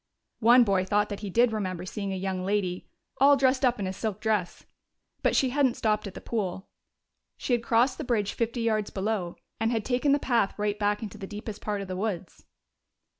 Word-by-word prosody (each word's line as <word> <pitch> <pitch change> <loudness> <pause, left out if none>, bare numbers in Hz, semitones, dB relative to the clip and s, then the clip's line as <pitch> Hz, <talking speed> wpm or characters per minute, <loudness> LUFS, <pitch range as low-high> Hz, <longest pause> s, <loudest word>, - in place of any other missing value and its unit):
One 240 +2 +7
boy 195 -4 +2
thought 205 +2 +1
that 205 - -5
he 205 - -5
did 235 +5 +3
remember 185 -5 -3
seeing 200 +1 -4
a - - -2
young 190 -1 -3
lady 185 -2 -1 0.3
"all 280 +1 +6
dressed 260 0 +2
up 250 -2 +3
in 200 - -2
a 185 - -3
silk 210 0 -3
dress." 210 -6 -1 0.6
But - - +2
she 260 -2 +3
hadn't 270 -3 +2
stopped 215 -1 0
at 195 - -9
the - - -6
pool; 190 -4 -3 0.7
she 250 - -2
had 240 - +2
crossed 235 +4 +2
the - - -2
bridge 220 -6 0
fifty 235 +1 -2
yards 215 -2 0
below 190 -3 -2 0.2
and 225 +1 +1
had 225 -3 -1
taken 255 +3 +1
the 285 - +5
path 235 -8 0
right 210 0 -1
back 205 +1 0
into 215 0 -7
the 195 - -6
deepest 210 +1 -7
part 205 -1 -2
of 195 - -6
the 185 - -4
woods. 190 -3 -4
210 Hz, 215 wpm, -27 LUFS, 195-235 Hz, 0.7 s, One